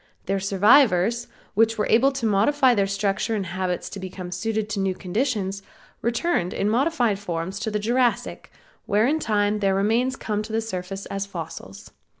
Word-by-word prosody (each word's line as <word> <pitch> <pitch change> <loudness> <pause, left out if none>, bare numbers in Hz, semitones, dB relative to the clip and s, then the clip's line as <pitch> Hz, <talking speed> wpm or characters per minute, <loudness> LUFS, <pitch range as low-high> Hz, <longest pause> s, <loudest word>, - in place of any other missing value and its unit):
Their 195 +1 0
survivors, 210 +2 +4 0.3
which 225 +2 +3
were 210 - +1
able 260 +5 +4
to 265 -3 -3
modify 250 +6 +3
their 200 -3 +1
structure 200 +3 -1
and 200 -3 -2
habits 180 0 -3
to 200 - -6
become 185 -1 -7
suited 215 +3 -2
to 210 - -2
new 190 -1 0
conditions, 200 -1 -2 0.4
returned 235 - 0
in 205 +2 0
modified 245 -5 +1
forms 185 0 -4
in - - -1
the 210 - 0
Jurassic, 240 +3 0 0.4
where 210 +2 +3
in 305 +5 +1
time 210 -4 +1
their 195 -2 +2
remains 230 +6 +1
come 210 -5 -2
to 215 +1 -8
the 220 - +1
surface 195 -2 -5
as 195 0 -4
fossils. 105 - -8
205 Hz, 170 wpm, -24 LUFS, 195-230 Hz, 0.4 s, survivors